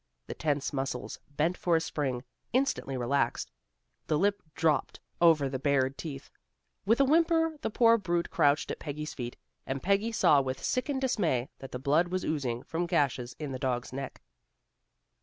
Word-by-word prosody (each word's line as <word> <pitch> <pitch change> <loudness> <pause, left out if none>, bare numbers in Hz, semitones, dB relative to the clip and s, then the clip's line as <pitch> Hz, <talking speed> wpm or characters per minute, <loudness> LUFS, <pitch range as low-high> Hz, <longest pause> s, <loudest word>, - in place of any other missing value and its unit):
The - - -5
tense 145 -2 -1
muscles, 135 -1 -3
bent 155 +5 0
for 175 -2 +1
a - - +4
spring, 135 -6 -2 0.3
instantly 255 - 0
relaxed. 120 0 0 0.6
The 155 - +2
lip 200 +4 +1
dropped 160 -2 +1 0.2
over 160 -5 +5
the 130 -1 -3
bared 135 -1 +2
teeth. 140 -4 -7 0.6
With 225 +4 +4
a 275 - +6
whimper 325 +2 +3
the - - -1
poor 230 +1 +5
brute 175 -3 -1
crouched 145 +1 +2
at - - -5
Peggy's 150 0 -5
feet, 120 -2 -6 0.3
and 135 0 -3
Peggy 200 +4 +2
saw 150 -10 +5
with 130 0 -4
sickened 265 +1 -1
dismay 170 - +1
that 135 - -9
the - - -3
blood 145 +6 +2
was 185 +1 -2
oozing 130 -6 -2
from 170 +2 -2
gashes 130 -6 0
in 150 -3 -5
the 130 - -4
dog's 125 -2 -2
neck. 135 +1 -6
150 Hz, 170 wpm, -30 LUFS, 135-185 Hz, 0.6 s, a